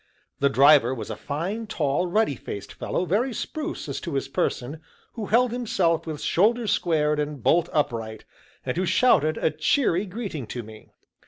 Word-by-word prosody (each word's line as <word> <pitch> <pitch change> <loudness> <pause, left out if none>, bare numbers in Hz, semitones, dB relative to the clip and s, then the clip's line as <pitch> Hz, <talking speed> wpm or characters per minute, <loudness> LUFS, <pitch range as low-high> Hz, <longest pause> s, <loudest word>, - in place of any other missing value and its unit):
The 140 - +3
driver 135 -2 +5
was 115 - -6
a - - -4
fine, 190 +10 -4
tall, 155 -3 0
ruddy 210 -2 +2
faced 100 -4 -8
fellow, 180 - -2
very 225 +8 0
spruce 310 - -4
as - - -4
to 170 -5 -4
his 135 - -1
person, 135 +2 -2 0.3
who 220 -4 -5
held 240 +2 +3
himself 180 -9 0
with 155 -2 -5
shoulders 220 +4 +2
squared 150 -3 +1
and 145 -4 -3
bolt 170 0 +3
upright, 115 -7 -2 0.4
and - - -2
who 185 - +1
shouted 155 - +3
a - - +1
cheery 210 - +1
greeting 185 - -5
to 120 +1 -5
me. 110 0 -13
165 Hz, 170 wpm, -25 LUFS, 140-210 Hz, 0.4 s, driver